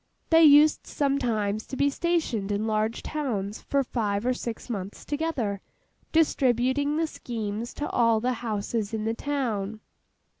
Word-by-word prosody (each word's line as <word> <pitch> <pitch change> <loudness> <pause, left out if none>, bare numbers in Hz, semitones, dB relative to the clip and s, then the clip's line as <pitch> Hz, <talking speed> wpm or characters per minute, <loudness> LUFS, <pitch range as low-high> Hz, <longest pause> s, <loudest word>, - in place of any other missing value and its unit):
They 325 0 +7
used 300 0 +6
sometimes 230 -7 0
to 265 - -6
be 280 +1 +3
stationed 295 - -1
in 205 +2 0
large 220 +1 -1
towns 220 -9 -3
for 280 -1 0
five 210 -4 -1
or 255 - +2
six 235 -2 -6
months 200 -5 -5
together, 285 -10 -2 0.5
distributing 285 -1 +2
the 325 - +2
schemes 225 -6 -5
to 295 - -3
all 230 -2 +3
the 250 +3 0
houses 220 -1 -2
in 215 - -3
the 225 - 0
town. 230 -6 -2
235 Hz, 145 wpm, -26 LUFS, 215-285 Hz, 0.5 s, They